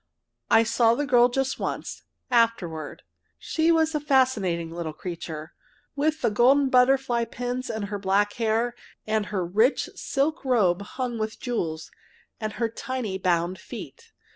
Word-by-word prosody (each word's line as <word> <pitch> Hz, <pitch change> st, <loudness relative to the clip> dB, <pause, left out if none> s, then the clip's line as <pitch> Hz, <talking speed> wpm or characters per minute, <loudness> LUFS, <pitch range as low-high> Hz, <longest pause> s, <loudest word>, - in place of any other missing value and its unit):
I 225 Hz, 0 st, +6 dB
saw 230 Hz, 0 st, +3 dB
the 290 Hz, -, -1 dB
girl 245 Hz, -2 st, +5 dB
just 265 Hz, +1 st, -1 dB
once -, -, -4 dB, 0.3 s
afterward. 195 Hz, -10 st, 0 dB, 0.3 s
She 325 Hz, +1 st, +1 dB
was 320 Hz, -1 st, +2 dB
a 300 Hz, -, 0 dB
fascinating 240 Hz, -, +1 dB
little 165 Hz, -2 st, -5 dB
creature, 160 Hz, -2 st, -7 dB, 0.4 s
with 305 Hz, +1 st, 0 dB
the 235 Hz, -, +3 dB
golden 265 Hz, +5 st, +4 dB
butterfly 250 Hz, -2 st, +3 dB
pins 245 Hz, +2 st, -4 dB
in 220 Hz, -2 st, -3 dB
her 200 Hz, 0 st, -4 dB
black 200 Hz, +1 st, +1 dB
hair, 225 Hz, +2 st, +1 dB, 0.3 s
and 215 Hz, -1 st, 0 dB
her 190 Hz, -4 st, -2 dB
rich 220 Hz, +10 st, +2 dB
silk 290 Hz, +3 st, -1 dB
robe 205 Hz, -9 st, +2 dB
hung 240 Hz, +2 st, -4 dB
with 215 Hz, 0 st, -3 dB
jewels, 165 Hz, -11 st, -3 dB, 0.5 s
and 215 Hz, -2 st, -3 dB
her 230 Hz, -, 0 dB
tiny 225 Hz, -4 st, -4 dB
bound 175 Hz, 0 st, 0 dB
feet. 460 Hz, -, -10 dB
230 Hz, 145 wpm, -25 LUFS, 190-260 Hz, 0.5 s, I